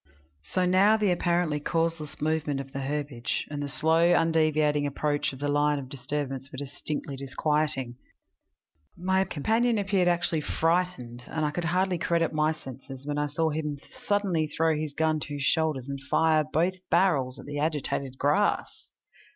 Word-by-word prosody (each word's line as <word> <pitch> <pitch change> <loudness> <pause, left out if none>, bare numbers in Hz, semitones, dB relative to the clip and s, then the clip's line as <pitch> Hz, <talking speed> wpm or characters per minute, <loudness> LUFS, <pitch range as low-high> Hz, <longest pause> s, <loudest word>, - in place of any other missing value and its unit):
So 180 - -1
now 195 +4 +5
the 210 -3 +2
apparently 170 -3 +1
causeless 165 0 -2
movement 150 -2 0
of 135 0 -7
the 135 - -3
herbage, 140 -3 -2
and 145 -1 -3
the 145 - -3
slow, 165 +4 +3
undeviating 155 -3 +2
approach 145 +1 -1
of 135 - -9
the 145 +2 -2
line 145 0 +2
of 135 -2 -6
disturbance 135 0 -4
were - - -8
distinctly 145 +1 -5
disquieting. 135 -2 -1 1.0
My 190 +2 +2
companion 225 +10 +1
appeared 195 -3 +1
actually 170 -2 +1
frightened, 160 -8 -1
and 155 -1 -1
I 150 - 0
could 170 +3 -3
hardly 180 +1 +1
credit 165 -1 +1
my 155 0 +2
senses 135 -2 -9
when 145 0 -2
I 150 - +1
saw 160 +2 0
him 150 -1 -3 0.3
suddenly 195 -6 +1
throw 160 +1 +1
his 150 -1 -4
gun 160 -1 +1
to 145 0 -5
his 140 - -4
shoulders 155 -4 +1
and 140 -1 -5
fire 160 -1 +3
both 170 +4 +2 0.2
barrels 155 -8 +2
at - - -11
the 145 0 -4
agitated 145 -3 -2
grass! 150 +10 +1
155 Hz, 165 wpm, -27 LUFS, 145-170 Hz, 1.0 s, now